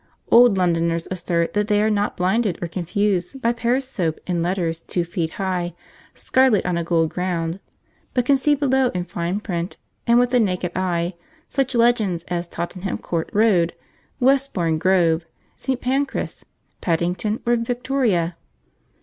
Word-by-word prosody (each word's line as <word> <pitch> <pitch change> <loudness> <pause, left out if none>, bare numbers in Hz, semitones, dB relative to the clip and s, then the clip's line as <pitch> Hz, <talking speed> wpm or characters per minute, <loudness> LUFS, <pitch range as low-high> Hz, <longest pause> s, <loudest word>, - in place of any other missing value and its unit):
Old 235 -4 +7
Londoners 170 -2 +1
assert 170 -2 -1
that 210 0 +1
they 210 -1 +3
are 215 +1 +2
not 205 0 0
blinded 190 +1 +1
or 175 - -3
confused 185 +6 -1
by 235 -2 +1
Pears' 240 +3 0
Soap 170 -11 -2
in 175 -2 -1
letters 170 -2 -1
two 175 - -2
feet 170 -1 -2
high, 180 -3 -2 0.4
scarlet 260 -5 +3
on 180 -1 0
a 170 - -1
gold 165 -1 +1
ground, 175 -1 -2 0.6
but 250 -2 +2
can 280 - +5
see 290 +2 +3
below 265 -2 +2
in 180 - 0
fine 175 +2 -3
print, 175 -4 -4 0.3
and 235 0 +5
with 245 0 +3
the 250 - +4
naked 180 -5 0
eye, 175 -1 0 0.4
such 270 -2 0
legends 225 -8 +2
as 175 -1 -2
Tottenham 180 +3 -4
Court 165 -2 -3
Road, 200 -6 +3 0.4
Westbourne 250 - +2
Grove, 170 -2 +3 0.3
St. 260 -2 -2
Pancras, 270 +3 -2 0.4
Paddington, 180 +6 -1
or 240 0 +3
Victoria. 235 -8 0
185 Hz, 150 wpm, -22 LUFS, 170-235 Hz, 0.6 s, Old